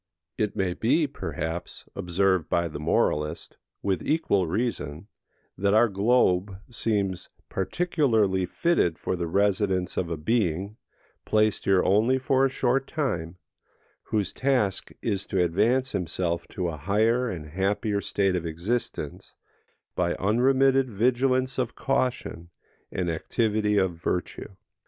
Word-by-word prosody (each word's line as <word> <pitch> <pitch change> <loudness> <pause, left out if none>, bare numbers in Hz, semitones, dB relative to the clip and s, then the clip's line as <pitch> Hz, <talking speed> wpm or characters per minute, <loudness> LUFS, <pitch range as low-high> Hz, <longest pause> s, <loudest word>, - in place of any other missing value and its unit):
It 105 -2 -1
may 95 -2 0
be, 140 - +2
perhaps, 80 - -5
observed 90 -1 +1
by 85 0 +1
the 75 -2 -7
moralist, 75 0 0 0.3
with 95 -2 0
equal 100 - +1
reason, 85 - -2 0.5
that 100 +1 +2
our 120 +2 +6
globe 100 -2 +2
seems 100 -6 -1 0.2
particularly 110 - +1
fitted 90 - +1
for - - -2
the 85 -1 -3
residence 95 0 +1
of 85 - -1
a 85 - -3
being, 100 +2 -1 0.5
placed 110 -1 +1
here 95 -2 +4
only 110 +7 +3
for 130 0 +2
a 135 - +4
short 130 +1 0
time, 90 - -2 0.7
whose 105 -3 -1
task 125 -8 0
is 100 -4 -1
to 95 -2 +1
advance 115 +10 +2
himself 85 -2 -2
to 90 -2 -3
a 80 - -5
higher 110 - +1
and 80 -6 -6
happier 100 +4 0
state 100 -1 0
of 90 - -1
existence, 85 -1 -4 0.6
by 85 -1 0
unremitted 130 +5 +3
vigilance 130 +4 +1
of 125 -3 -2
caution, 125 -10 -2 0.4
and 90 -1 -2
activity 105 +5 0
of 95 -3 +2
virtue. 90 +3 -3
100 Hz, 130 wpm, -26 LUFS, 90-120 Hz, 0.7 s, our